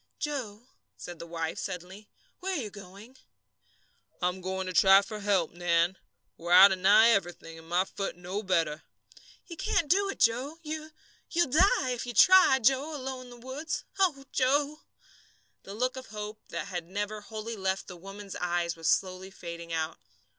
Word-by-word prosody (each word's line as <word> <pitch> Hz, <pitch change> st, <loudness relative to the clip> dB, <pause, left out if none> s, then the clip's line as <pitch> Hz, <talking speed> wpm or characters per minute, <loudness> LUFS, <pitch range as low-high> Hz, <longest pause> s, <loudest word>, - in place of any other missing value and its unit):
"Joe," 245 Hz, -8 st, -4 dB, 0.3 s
said 175 Hz, -2 st, -9 dB
his 170 Hz, -, -9 dB
wife, 165 Hz, -1 st, -3 dB
suddenly, 190 Hz, +2 st, -7 dB, 0.3 s
"where 380 Hz, +1 st, -3 dB
are -, -, -1 dB
you 215 Hz, -5 st, -5 dB
going?" 200 Hz, +5 st, -13 dB, 1.0 s
"I'm 180 Hz, +1 st, -1 dB
going 190 Hz, +1 st, -3 dB
to 185 Hz, -, -5 dB
try 195 Hz, +2 st, +7 dB
for 210 Hz, +1 st, -7 dB
help, 200 Hz, -5 st, +1 dB
Nan. 175 Hz, +1 st, +1 dB, 0.4 s
We're 170 Hz, +1 st, -1 dB
out 190 Hz, +2 st, +10 dB
of 190 Hz, -, -1 dB
nigh 205 Hz, +5 st, +6 dB
everything, 175 Hz, -6 st, -1 dB
and 160 Hz, 0 st, -16 dB
my 180 Hz, +2 st, +2 dB
foot 195 Hz, 0 st, -5 dB
no 180 Hz, +4 st, -4 dB
better." 165 Hz, -6 st, 0 dB, 0.6 s
"You 335 Hz, -, -10 dB
can't 310 Hz, -1 st, 0 dB
do 395 Hz, +2 st, +3 dB
it, -, -, -6 dB
Joe. 255 Hz, +7 st, +1 dB
You 310 Hz, 0 st, -5 dB, 0.4 s
you'll 345 Hz, -6 st, +1 dB
die, 320 Hz, -, +3 dB
if 245 Hz, 0 st, -4 dB
you 240 Hz, -, -6 dB
try, 370 Hz, -, +7 dB
Joe, 270 Hz, +5 st, +1 dB
alone 260 Hz, -2 st, -6 dB
in -, -, -13 dB
the 245 Hz, -, -12 dB
woods. 285 Hz, +5 st, -4 dB, 0.2 s
Oh, 300 Hz, -8 st, +1 dB
Joe!" 285 Hz, +3 st, +1 dB, 0.8 s
The 195 Hz, -, -9 dB
look 255 Hz, +3 st, -1 dB
of 260 Hz, 0 st, -8 dB
hope 210 Hz, 0 st, -7 dB
that -, -, -5 dB
had 175 Hz, -3 st, -5 dB
never 205 Hz, +3 st, -4 dB
wholly 220 Hz, +2 st, -6 dB
left 190 Hz, -1 st, -2 dB
the 180 Hz, -, -10 dB
woman's 195 Hz, +2 st, -9 dB
eyes 175 Hz, -1 st, -1 dB
was 165 Hz, -1 st, -1 dB
slowly 185 Hz, 0 st, 0 dB
fading 170 Hz, -2 st, -9 dB
out. 160 Hz, -5 st, -2 dB
205 Hz, 175 wpm, -29 LUFS, 180-260 Hz, 1.0 s, out